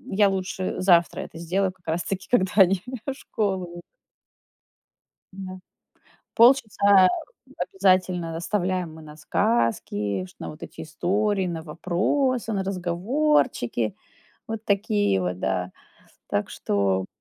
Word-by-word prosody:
Я 205 0 +5
лучше 190 -1 -3
завтра 175 -2 +4
это - - -9
сделаю 185 +3 0
как 190 -3 -34
раз 165 +2 -1
таки, 195 0 -4
когда 190 -7 +3
они 195 -2 +5 0.2
в 275 - -2
школу 200 -8 -2
уй 175 - -8 1.5
Да. 185 -1 -8 0.8
Полчаса 210 -6 +6 0.6
обязательно 185 -3 +1
оставляем 180 -2 -1
мы 160 - -12
на 150 -1 -12
сказки, 110 -8 0
ш - - -18
на - - -6
вот 155 - -13
эти - - -9
истории, 190 +6 0
на 165 -2 -4
вопросы, 215 - 0
на 195 -2 -1
разговорчики. 185 - 0 0.5
Вот 225 0 -5
такие 205 - +1
вот, 90 0 -2
да. 95 -1 -2 0.6
Так - - -1
что 95 -2 0
185 Hz, 120 wpm, -25 LUFS, 160-200 Hz, 1.5 s, Полчаса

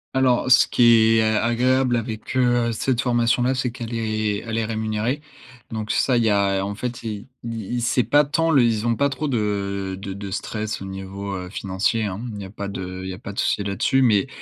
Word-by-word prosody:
Alors, 130 -1 +2
ce 125 - +7
qui 115 -2 +5
est - - +4
a 110 0 +1
agréable 125 +2 +2
avec, 110 +1 -5
heu, 120 -2 +2
cette 125 +2 0
formation 120 -1 +2
là, 130 +2 +2
c'est 125 -1 -1
qu'elle 120 -1 -6
est 110 -2 -1
elle 115 0 -2
est 115 - 0
rémunérée, 110 +5 -2 0.5
donc 110 -1 -4
ça, 125 -3 +2
il 115 - +2
y 110 - +3
a, 100 -1 +2
en 100 +1 -4
fait 120 +2 -5
i 105 -1 -6 0.2
i 115 - -5 0.3
i 120 - -1
c'est 120 +1 +2
pas 145 +7 +4
tant 165 +3 +1
le 140 -5 +5
ils 115 -2 +1
ont 120 -1 +2
pas 140 +4 +2
trop 140 +2 -3
de 100 -5 -2
de 100 -1 -6
de 100 0 -7
stress 105 +1 -4
au - - -6
niveau, 95 +1 -6
heu, 90 -1 -6
financier 100 +3 -1
hein, 95 -1 -3
hem, 120 - -6
il 105 - -7
n'y 100 - -6
a 95 - -10
pas 100 -1 -5
de 95 -1 -6
il 95 - -5
y - - -4
a 90 - -8
pas 100 - -8
de - - -5
souci 100 - +1
là-dessus, 100 +7 +1
mais 105 -5 +3
110 Hz, 240 wpm, -22 LUFS, 100-120 Hz, 0.5 s, ce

